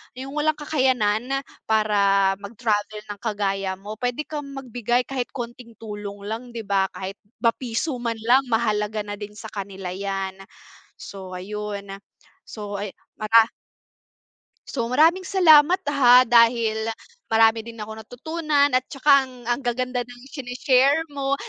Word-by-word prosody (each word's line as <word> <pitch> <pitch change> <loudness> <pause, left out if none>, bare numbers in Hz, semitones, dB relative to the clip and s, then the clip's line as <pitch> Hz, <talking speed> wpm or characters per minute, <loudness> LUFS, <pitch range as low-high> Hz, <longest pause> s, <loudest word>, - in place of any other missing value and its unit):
yung 265 +2 -7
walang 300 +1 +1
kakayanan 260 -3 0 0.2
para 200 -3 +3
mag-travel 210 0 -2
ng 205 - -8
kagaya 195 -3 -1
mo, 205 +3 -9
puwede 245 +4 -1
kang 295 -2 -6
magbigay 245 -2 -1
kahit 250 -1 -3
konting 240 -2 -7
tulong 205 -2 -8
lang, 230 +4 -6
di 225 - -4
ba? 195 -2 +1
Kahit 195 +1 -6 0.2
ba 230 - +5
piso 250 +3 -3
man 235 -1 -2
lang 255 +3 +4
mahalaga 215 -2 0
na 205 0 -7
din 210 0 -8
sa 220 0 -9
kanila 195 -2 -6
'yan. 195 0 -4 0.6
So 190 -2 -9
ayun. 200 +1 -5 0.6
So, 205 -2 -6
ayu 205 -1 -5 0.2
mara 225 +1 +5 1.2
So, 235 -4 -2
maraming 325 +9 +3
salamat 350 -1 +6
ha, 250 -3 +7
dahil 230 -2 +3 0.4
marami 225 0 +3
din 235 - -8
akong 220 +1 -7
natutunan 290 +5 0
at 255 0 +2
tsaka 280 -1 +4
ang 260 - -12 0.2
ang 240 - +2
gaganda 250 0 -1
ng 245 0 -13
shine-share 270 +2 +2
mo. 275 -1 -1
230 Hz, 140 wpm, -23 LUFS, 205-260 Hz, 1.2 s, ha